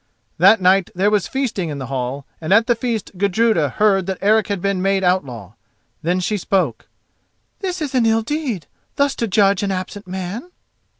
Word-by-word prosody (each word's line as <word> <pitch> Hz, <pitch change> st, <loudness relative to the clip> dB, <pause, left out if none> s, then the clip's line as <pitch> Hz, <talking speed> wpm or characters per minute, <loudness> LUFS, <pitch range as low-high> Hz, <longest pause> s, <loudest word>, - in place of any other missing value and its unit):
That 195 Hz, +6 st, +6 dB
night 185 Hz, 0 st, +4 dB
there 195 Hz, +3 st, +2 dB
was 205 Hz, -6 st, +1 dB
feasting 235 Hz, -11 st, -2 dB
in 145 Hz, -, -4 dB
the 135 Hz, -, -5 dB
hall, 135 Hz, +1 st, -4 dB, 0.2 s
and 160 Hz, -, -4 dB
at 225 Hz, +3 st, +5 dB
the 240 Hz, -, +3 dB
feast 230 Hz, -5 st, -4 dB
Gudruda 200 Hz, -5 st, +2 dB
heard 195 Hz, -3 st, +2 dB
that 190 Hz, -1 st, -2 dB
Eric 215 Hz, +2 st, +3 dB
had 200 Hz, -2 st, -2 dB
been 195 Hz, 0 st, -1 dB
made 195 Hz, 0 st, +1 dB
outlaw. 125 Hz, -, -1 dB, 0.5 s
Then 175 Hz, +3 st, 0 dB
she 210 Hz, +4 st, -1 dB
spoke: 175 Hz, -, -1 dB, 0.7 s
"This 365 Hz, -4 st, -3 dB
is 285 Hz, -, -4 dB
an 245 Hz, -3 st, +3 dB
ill 225 Hz, 0 st, +2 dB
deed, 250 Hz, -, -3 dB, 0.3 s
thus 280 Hz, -1 st, +2 dB
to 230 Hz, -, -1 dB
judge 200 Hz, -2 st, +3 dB
an 200 Hz, -, -1 dB
absent 190 Hz, +1 st, -5 dB
man." 190 Hz, -, -5 dB
195 Hz, 185 wpm, -20 LUFS, 180-225 Hz, 0.7 s, That